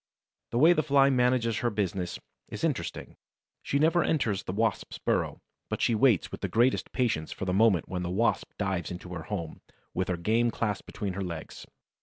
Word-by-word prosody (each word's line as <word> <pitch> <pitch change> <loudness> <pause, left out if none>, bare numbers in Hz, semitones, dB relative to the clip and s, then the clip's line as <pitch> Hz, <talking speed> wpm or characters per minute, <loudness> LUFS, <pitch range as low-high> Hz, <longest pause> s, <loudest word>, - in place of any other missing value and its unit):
The 120 - -2
way 160 +7 +7
the 155 - +2
Fly 140 -2 +4
manages 125 -3 +2
her 120 - +1
business 95 -4 -2 0.3
is - - -7
interesting. - - -3 0.4
She 140 - -1
never 160 +4 +3
enters 110 -11 0
the - - -5
Wasp's 110 +4 -1
burrow, - - -1 0.3
but - - -2
she 120 - +2
waits 115 -4 +3
with - - -7
the - - -1
greatest 120 +3 +2
patience 115 - 0
for - - -5
the 90 - 0
moment 100 -4 +3
when 90 -1 -3
the 90 - -3
Wasp 110 +6 +1
dives 95 -6 -1
into 90 0 -7
her 80 -3 -6
home, 85 -6 -5 0.3
with 95 +1 -1
her 90 - -1
game 115 +7 +2
clasped 105 -3 -2
between 100 -3 -4
her 100 +1 -3
legs. 85 -4 -7
105 Hz, 195 wpm, -28 LUFS, 90-125 Hz, 0.4 s, way